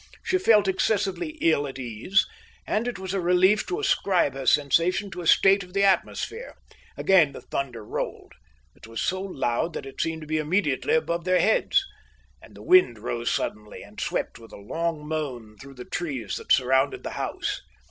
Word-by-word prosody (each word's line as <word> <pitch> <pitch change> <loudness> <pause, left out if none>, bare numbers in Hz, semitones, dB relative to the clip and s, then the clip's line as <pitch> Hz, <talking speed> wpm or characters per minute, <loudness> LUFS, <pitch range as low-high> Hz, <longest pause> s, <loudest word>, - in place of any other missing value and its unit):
She 370 - +1
felt 215 - +4
excessively 210 - -1
ill 145 -3 +2
at 135 - -8
ease, 125 - 0 0.4
and 220 +3 -1
it 245 - -3
was 190 0 -5
a 195 - 0
relief 180 +4 +3
to 375 +2 -2
ascribe 195 - +1
her 135 -1 -6
sensation 170 +7 +2
to 180 - -6
a 170 - -4
state 195 +4 +5
of 180 -1 -11
the 200 0 +2
atmosphere. 320 - 0 0.4
Again 170 -7 +4
the - - -9
thunder 125 -6 -4
rolled. - - -5 0.4
It - - -15
was 115 0 -6
so 185 +1 -1
loud 165 -4 -2
that - - -6
it 135 0 -6
seemed 160 -1 -2
to 155 - -9
be 155 0 0
immediately 155 -3 +1
above 170 +1 -1
their 185 +1 +2
heads. 390 - +2 0.6
And - - -16
the - - -12
wind 370 +1 +5
rose 120 0 -3
suddenly 105 0 -4
and - - -10
swept - - -3
with 115 - -15
a - - -10
long 155 +8 -3
moan 130 -9 -4
through 135 0 -12
the 125 -1 -9
trees 135 - -4
that - - -8
surrounded 130 +1 +3
the - - -5
house. - - -3
165 Hz, 190 wpm, -25 LUFS, 135-195 Hz, 0.6 s, state